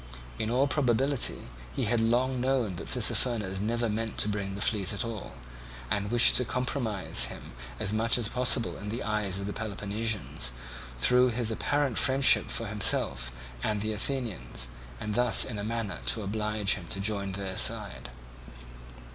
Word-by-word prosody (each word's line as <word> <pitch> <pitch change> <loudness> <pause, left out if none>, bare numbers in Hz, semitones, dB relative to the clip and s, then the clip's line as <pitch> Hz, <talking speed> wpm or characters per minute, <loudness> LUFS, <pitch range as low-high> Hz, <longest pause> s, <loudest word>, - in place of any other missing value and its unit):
In 110 - -1
all 130 +4 +3
probability 135 -1 +1 0.3
he - - -1
had 115 +1 +1
long 125 +3 +1
known 125 -8 0
that - - -7
Tissaphernes 105 -6 +1
never 115 +2 0
meant 110 +1 -3
to - - +2
bring 100 -2 -3
the - - -6
fleet 105 -2 +1
at 100 - -1
all, 115 -4 -6 0.6
and 100 0 0
wished 120 +1 +5
to 125 - +2
compromise 120 -4 0
him - - -9 0.3
as 95 - -1
much 115 +3 +2
as 120 -3 -2
possible 125 0 +3
in 105 - -6
the 115 +4 -4
eyes 105 -3 -1
of 100 - -5
the 105 - -4
Peloponnesians 105 - -3 0.5
through 125 - +4
his 115 -1 -1
apparent 145 +2 0
friendship 135 0 +4
for 115 - -2
himself 70 - +1 0.3
and 105 - -1
the 110 +1 -2
Athenians, 105 - -3 0.3
and 105 - -3
thus 125 +2 +5
in 110 -5 -5
a - - -3
manner 115 -1 -3
to 110 - +2
oblige 105 0 0
him 90 -4 -7
to 100 - -4
join 100 -1 -1
their 95 -1 -4
side. - - +2
110 Hz, 165 wpm, -29 LUFS, 100-120 Hz, 0.6 s, wished